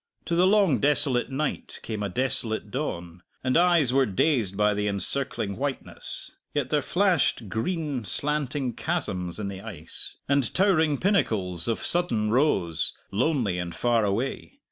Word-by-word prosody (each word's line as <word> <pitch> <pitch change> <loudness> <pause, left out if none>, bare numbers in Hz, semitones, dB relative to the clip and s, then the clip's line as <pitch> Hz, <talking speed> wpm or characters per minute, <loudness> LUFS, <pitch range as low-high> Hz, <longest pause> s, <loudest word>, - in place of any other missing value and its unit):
To 170 - -2
the 180 +2 +4
long 195 -8 +4
desolate 140 -3 +2
night 140 +2 -3
came 110 -2 -4
a 100 - -2
desolate 110 -1 -1
dawn, 90 - -4 0.2
and 130 0 +1
eyes 170 -7 +4
were 135 -1 +3
dazed 105 - +1
by 105 0 +3
the 105 0 -1
encircling 100 +1 0
whiteness; 140 +1 -4 0.2
yet 145 -3 -1
there 150 -1 +3
flashed 175 - +1
green 145 - -2
slanting 140 +2 -1
chasms 100 - -3
in 105 - -3
the 95 -1 -6
ice, 85 -8 -6
and 140 -2 +2
towering 160 -7 +3
pinnacles 100 - +1
of 115 - -1
sudden 115 -12 +1
rose, 95 - +1 0.2
lonely 110 - 0
and 85 -1 -5
far 120 +3 +2
away. 115 - -2
125 Hz, 145 wpm, -26 LUFS, 100-150 Hz, 0.2 s, the